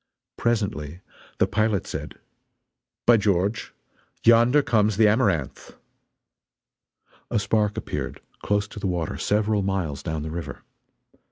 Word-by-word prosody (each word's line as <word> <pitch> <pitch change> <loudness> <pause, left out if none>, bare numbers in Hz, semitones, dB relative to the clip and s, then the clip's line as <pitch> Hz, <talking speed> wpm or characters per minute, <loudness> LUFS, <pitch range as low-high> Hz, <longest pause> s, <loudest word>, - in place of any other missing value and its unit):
Presently 95 -8 -2 0.4
the - - +4
pilot 110 -2 0
said: - - -6 0.9
"By 120 -1 +7
George, 100 +1 0 0.5
yonder 120 +5 +5
comes 110 -4 +2
the 110 -1 +6
Amaranth!" 105 - 0 1.5
A 115 - 0
spark 105 0 +1
appeared, - - -4 0.2
close 100 0 0
to - - -9
the 100 - -2
water, 85 -3 -2
several 105 0 +1
miles 95 -8 -2
down 80 -2 -4
the 80 - -5
river. 85 +1 -6
105 Hz, 115 wpm, -24 LUFS, 90-110 Hz, 1.5 s, By